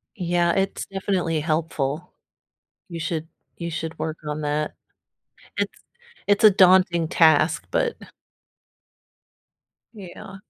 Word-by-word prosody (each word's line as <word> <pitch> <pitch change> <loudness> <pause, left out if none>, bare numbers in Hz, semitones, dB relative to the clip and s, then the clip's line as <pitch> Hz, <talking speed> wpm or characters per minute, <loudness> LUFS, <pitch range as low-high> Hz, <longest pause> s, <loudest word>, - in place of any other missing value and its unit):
Yeah, 175 -2 +1
it's 195 0 -1
definitely 190 -5 -1
helpful. 155 0 -2 0.7
You 170 -2 -7
should 160 0 -3 0.3
you 170 -1 -5
should 160 0 -5
work 160 0 -4
on 150 +1 -3
that. 150 +1 -2 0.8
It's - - -2 0.5
it's 205 +2 +2
a 215 - +10
daunting 185 -3 +4
task, 160 0 +3
but 485 -1 0 1.9
Yeah. 195 -2 -11
170 Hz, 105 wpm, -23 LUFS, 155-190 Hz, 1.9 s, a